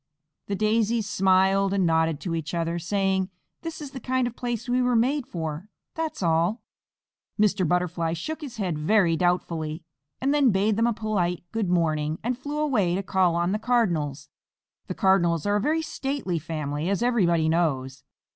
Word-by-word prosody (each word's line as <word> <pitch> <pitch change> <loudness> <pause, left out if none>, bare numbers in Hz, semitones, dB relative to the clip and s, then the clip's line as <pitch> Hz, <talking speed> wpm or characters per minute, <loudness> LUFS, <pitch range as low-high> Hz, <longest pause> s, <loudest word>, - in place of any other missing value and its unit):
The 200 - -1
Daisies 220 +1 +1
smiled 195 0 +3
and 190 -2 +2
nodded 160 -2 +2
to 175 - -3
each 165 +1 -3
other, 170 0 -1
saying, 190 +1 0 0.3
"This 330 -1 -6
is 290 -3 -7
the 265 - -7
kind 255 +1 0
of 240 -1 -4
place 240 -1 -4
we 250 +1 +2
were 250 -1 +2
made 255 +3 +1
for, 160 - -5 0.2
that's 320 -8 -3
all." 170 +7 +1 0.8
Mr. 200 -4 +3
Butterfly 175 -1 0
shook 310 - -5
his 260 -6 -8
head 180 -7 -2
very 170 +1 +3
doubtfully, 165 -2 -1 0.4
and 275 +2 +1
then 285 -3 +4
bade 205 +1 +2
them 230 +2 +2
a 235 - +1
polite 195 -6 -1
"Good 220 -5 -1
morning," 155 -3 +1
and 245 +2 0
flew 290 +4 -5
away 230 -13 +1
to 195 - -2
call 185 -3 +2
on 175 +1 +1
the 210 - 0
Cardinals. 165 - 0 0.6
The - - -4
Cardinals 175 -4 +2
are 205 0 +2
a - - -1
very 315 +6 +1
stately 270 - -3
family, 150 0 -3
as 200 +3 0
everybody 175 -10 +2
knows. 135 -6 0
190 Hz, 175 wpm, -25 LUFS, 165-235 Hz, 0.8 s, then